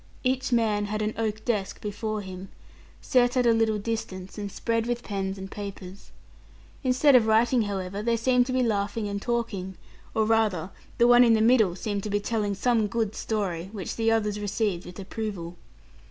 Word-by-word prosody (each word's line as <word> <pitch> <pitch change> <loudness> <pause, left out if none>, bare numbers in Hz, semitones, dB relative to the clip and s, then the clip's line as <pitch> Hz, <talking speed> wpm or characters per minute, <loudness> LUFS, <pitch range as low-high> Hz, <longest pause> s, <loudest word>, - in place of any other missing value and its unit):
Each 260 +1 0
man 215 -3 +2
had 215 +1 -2
an 215 +1 -1
oak 220 -1 -3
desk 210 -5 -1
before 215 +1 -3
him, 190 0 -8 0.5
set 245 0 +3
at 250 - +3
a 235 - +5
little 225 -1 +2
distance, 200 -4 -5
and 200 -1 -4
spread 230 +2 -1
with 240 0 -2
pens 195 -1 -3
and 190 0 -8
papers. 200 -2 -8 0.7
Instead 260 +2 +4
of 230 -3 +5
writing, 230 +3 +4
however, 195 -1 -3
they 230 +1 +1
seemed 250 +1 +3
to - - -2
be 255 0 +2
laughing 210 -1 -1
and 200 0 -3
talking, 205 -6 -3 0.4
or 220 - +3
rather 215 -6 +1 0.3
the 235 - +5
one 245 0 +7
in 230 -2 +5
the - - +2
middle 220 -5 +4
seemed 205 +1 -3
to 210 - -5
be 205 0 +1
telling 205 -1 -1
some 225 +1 +2
good 220 0 -1
story, 190 -7 -3
which 195 -5 -5
the 225 0 +1
others 210 -2 +1
received 205 -3 -2
with 180 - -10
approval. 195 -3 -5
215 Hz, 185 wpm, -26 LUFS, 200-230 Hz, 0.7 s, one